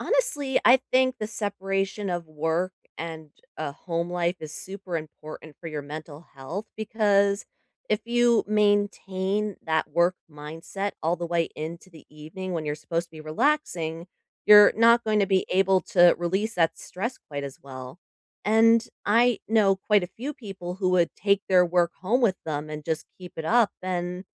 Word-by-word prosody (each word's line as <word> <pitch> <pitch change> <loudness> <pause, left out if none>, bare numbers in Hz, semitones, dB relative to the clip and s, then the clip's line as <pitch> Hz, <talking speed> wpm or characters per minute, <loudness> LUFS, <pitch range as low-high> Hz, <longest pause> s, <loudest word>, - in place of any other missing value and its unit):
Honestly, 305 - +1
I 255 +1 +7
think 255 0 +3
the 215 - -3
separation 200 -1 -3
of 175 -1 -3
work 160 +4 -1 0.2
and 160 -2 -7 0.3
a 145 -3 -4
home 170 +2 -4
life 175 0 0
is 155 -1 -7
super 190 -2 -6
important 155 -1 -9
for 170 - -8
your 150 -2 -4
mental 150 +2 -9
health 165 +11 -6
because 205 -2 +2 0.4
if 215 - +1
you 240 -1 +3
maintain 205 -1 0
that 160 0 +1
work 170 +3 +3 0.2
mindset 160 +7 -6
all 165 +2 +1
the 175 - -4
way 170 -1 0
into 170 +4 -7
the 160 -3 -15
evening 160 +5 -8
when 160 -2 -3
you're 150 0 -2
supposed 165 +2 -3
to - - -56
be 155 -1 -11
relaxing, 170 - -1 0.4
you're 210 -1 +9
not 235 +1 +5
going 215 -1 +2
to 200 - +3
be 190 -1 +2
able 190 0 +3
to 175 -4 +5
release 195 +6 -1
that 165 -1 +1
stress 230 +8 -5
quite 145 -1 -5
as 135 -1 -8
well 130 +3 -9 0.5
and 225 +2 +4 0.2
I 235 +2 +3
know 210 -3 +4
quite 205 0 +2
a - - -2
few 260 +10 -6
people 195 -8 -8
who 190 -1 0
would 175 -2 +2
take 200 0 +1
their 180 -2 +5
work 175 0 +2
home 235 +7 +1
with 195 -5 +3
them 155 0 -3
and 150 0 -6
just 160 +1 -2
keep 180 -2 -10
it 160 - -5
up, 225 +4 +4
and 180 0 -3
185 Hz, 175 wpm, -26 LUFS, 160-210 Hz, 0.5 s, you're